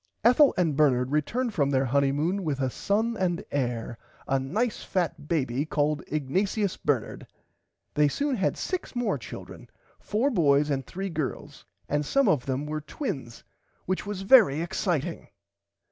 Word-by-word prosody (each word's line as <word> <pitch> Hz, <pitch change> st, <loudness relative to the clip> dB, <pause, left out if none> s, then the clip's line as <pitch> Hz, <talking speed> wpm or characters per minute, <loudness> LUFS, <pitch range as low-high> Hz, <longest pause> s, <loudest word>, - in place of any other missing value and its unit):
Ethel 250 Hz, +5 st, +6 dB
and 165 Hz, -5 st, +2 dB
Bernard 130 Hz, -4 st, +3 dB
returned 225 Hz, -, 0 dB
from 140 Hz, -7 st, +1 dB
their 135 Hz, -1 st, +2 dB
Honymoon 145 Hz, +8 st, +1 dB
with 145 Hz, -5 st, -2 dB
a 130 Hz, -1 st, 0 dB
son 220 Hz, -, 0 dB
and 180 Hz, -4 st, -1 dB
hair 120 Hz, -4 st, -2 dB, 0.3 s
a 135 Hz, -, +2 dB
nice 210 Hz, -, -1 dB
fat 175 Hz, -5 st, -2 dB
baby 135 Hz, -5 st, 0 dB
called 150 Hz, -1 st, 0 dB
Ignatius 190 Hz, +8 st, 0 dB
Bernard. 130 Hz, -7 st, -2 dB, 0.7 s
They 150 Hz, 0 st, +4 dB
soon 285 Hz, -, -1 dB
[Pg -, -, -5 dB
104] -, -, +3 dB
had -, -, -3 dB
six 370 Hz, -7 st, -4 dB
more 245 Hz, -1 st, 0 dB
children -, -, -10 dB, 0.3 s
four 235 Hz, +7 st, 0 dB
boys 150 Hz, -, +3 dB
and 135 Hz, -2 st, -2 dB
three 195 Hz, +2 st, -4 dB
girls 155 Hz, -5 st, -5 dB, 0.2 s
and 145 Hz, +1 st, 0 dB
some 275 Hz, -, +2 dB
of 140 Hz, -4 st, +2 dB
them 135 Hz, +2 st, -1 dB
were 155 Hz, 0 st, -3 dB
twins 140 Hz, -, -5 dB, 0.4 s
which 185 Hz, +2 st, -2 dB
was 200 Hz, -2 st, -4 dB
very 195 Hz, -, +6 dB
exciting. 170 Hz, -1 st, -2 dB
155 Hz, 160 wpm, -27 LUFS, 140-200 Hz, 0.7 s, Ethel